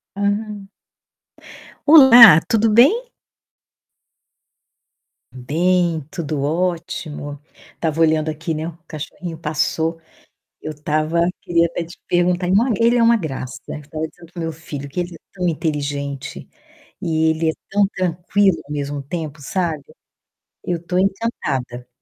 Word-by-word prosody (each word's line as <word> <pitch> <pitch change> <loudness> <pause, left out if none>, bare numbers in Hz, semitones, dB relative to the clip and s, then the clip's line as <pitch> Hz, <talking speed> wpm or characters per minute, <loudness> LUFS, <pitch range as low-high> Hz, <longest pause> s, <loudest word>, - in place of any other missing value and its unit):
Uhum. 205 0 -2 1.2
Olá, 245 - +10
tudo 225 -2 +2
bem? 390 - +4 2.2
Bem, 165 +5 0
tudo 150 -4 -3
ótimo. 165 -3 -3 0.4
Estava 160 -1 -2
olhando 155 -1 +3
aqui, 160 +2 -3
né, 155 +1 -3
o 170 -1 -9
cachorrinho 165 +2 -7
passou. 160 +1 -1 0.6
Eu 155 - -5
estava 155 +2 0 0.2
queria 170 -1 +2
até 170 +1 -4
te 170 +2 -14
perguntar 175 0 +1
não, 225 +5 +3
ele 235 +1 +3
é - - +3
uma 235 0 +5
graça. 135 - -5
Eu - - -6
estava 155 +2 -5
dizendo 170 +1 -17
para 175 - -6
o - - -3
meu 165 0 -3
filho 150 -3 -8
que 140 +6 -4
ele 175 0 -5
é - - -11
tão 180 -2 -2
inteligente 145 -4 -3 0.5
e 160 0 +1
ele 160 0 0
é - - -4 0.2
tão 200 0 +3
tranquilo 185 +2 +1
ao - - -17
mesmo 145 -1 -3
tempo, 155 0 -6
sabe? 160 0 -2 0.8
Eu 175 -2 -2
tô 180 - -1
encantada, 185 - -2
165 Hz, 135 wpm, -20 LUFS, 150-185 Hz, 2.2 s, Olá